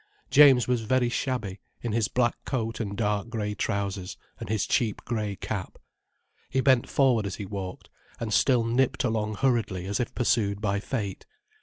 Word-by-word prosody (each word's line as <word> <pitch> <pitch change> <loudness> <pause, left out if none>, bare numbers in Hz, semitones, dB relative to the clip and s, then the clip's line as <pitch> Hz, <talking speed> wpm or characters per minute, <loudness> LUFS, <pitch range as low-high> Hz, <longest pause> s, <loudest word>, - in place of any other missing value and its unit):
James 135 -5 +7
was 125 -2 +1
very 120 +2 +1
shabby, 120 -7 -2 0.2
in 120 - -2
his 110 -1 +1
black 120 0 0
coat 115 -4 -2
and 100 -3 -4
dark 105 0 0
grey 105 -3 -2
trousers, 100 -2 -3 0.2
and - - -7
his 110 -2 0
cheap 120 -7 0
grey 105 -4 -2
cap. - - -5 0.7
He 130 - 0
bent 130 -2 +3
forward 125 -7 +3
as 100 - -4
he 100 - -6
walked, 95 -2 -6 0.3
and 110 -2 -3
still 125 -1 +4
nipped 120 +3 +1
along 110 -3 -1
hurriedly, 115 -7 0
as 100 +5 -2
if 125 - -3
pursued 110 -5 +1
by 100 -2 0
fate. 105 -3 -4
110 Hz, 170 wpm, -27 LUFS, 100-125 Hz, 0.7 s, James